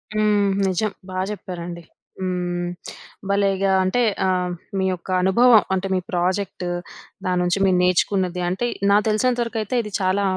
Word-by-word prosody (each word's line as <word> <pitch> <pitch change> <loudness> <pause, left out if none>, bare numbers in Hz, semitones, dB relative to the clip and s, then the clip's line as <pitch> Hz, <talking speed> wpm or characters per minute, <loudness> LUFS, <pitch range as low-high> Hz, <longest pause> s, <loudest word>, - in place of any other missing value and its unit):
హ్మ్. 210 -1 +3 0.2
నిజం. 190 +3 0 0.2
బా 185 0 -3
చెప్పారండి. 175 -4 -7 0.4
హ్మ్. 180 -1 -2 0.6
భలేగా 195 -1 +2
అంటే 185 +7 +1 0.2
ఆహ్, 180 -1 0 0.3
మీ 190 - +1
యొక్క 180 0 -7
అనుభవం. 220 +4 +6
అంటే 190 0 -1
మీ - - +2
ప్రాజెక్టు 180 +1 -1 0.6
దాని 180 -1 +1
నుంచి 180 +2 +1
మీరు 185 -1 +3
నేర్చుకున్నది, 180 0 +1
అంటే 190 +7 -1 0.3
నాకు 210 +2 +4
తెలిసినంత 245 +3 +1
వరకు 230 0 -5
అయితే 215 +4 -3
ఇది 210 - -8
చాలా 190 +2 +1
190 Hz, 145 wpm, -22 LUFS, 180-205 Hz, 0.6 s, అనుభవం